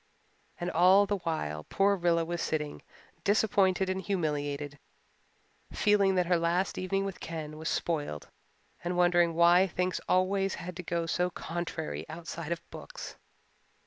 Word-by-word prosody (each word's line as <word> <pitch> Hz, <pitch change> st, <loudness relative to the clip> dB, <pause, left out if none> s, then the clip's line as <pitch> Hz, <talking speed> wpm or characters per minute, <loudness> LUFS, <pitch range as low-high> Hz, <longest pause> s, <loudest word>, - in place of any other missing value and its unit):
And 175 Hz, -, -2 dB
all 185 Hz, +4 st, +6 dB
the 200 Hz, 0 st, -1 dB
while, 115 Hz, -, -3 dB
poor 200 Hz, +1 st, +2 dB
Rilla 170 Hz, -2 st, +2 dB
was 170 Hz, 0 st, -3 dB
sitting, 150 Hz, -2 st, -2 dB, 0.4 s
disappointed 195 Hz, -3 st, +3 dB
and 190 Hz, 0 st, -1 dB
humiliated, 145 Hz, -5 st, -2 dB, 0.9 s
feeling 200 Hz, -2 st, +3 dB
that 180 Hz, -1 st, +2 dB
her 175 Hz, 0 st, +3 dB
last 170 Hz, +3 st, 0 dB
evening 195 Hz, +1 st, -1 dB
with 195 Hz, -2 st, -5 dB
Ken 155 Hz, -2 st, -6 dB
was 160 Hz, +1 st, -4 dB
spoiled 145 Hz, -, -2 dB, 0.6 s
and 175 Hz, +1 st, -2 dB
wondering 175 Hz, -1 st, +4 dB
why 175 Hz, +3 st, +6 dB
things 180 Hz, +1 st, -1 dB
always 195 Hz, +1 st, +2 dB
had 175 Hz, +1 st, -7 dB
to -, -, -4 dB
go 170 Hz, -1 st, -2 dB
so 180 Hz, +2 st, 0 dB
contrarily 160 Hz, -, -5 dB
outside 165 Hz, 0 st, -6 dB
of 170 Hz, 0 st, -4 dB
books. -, -, -8 dB
175 Hz, 145 wpm, -30 LUFS, 165-190 Hz, 0.9 s, all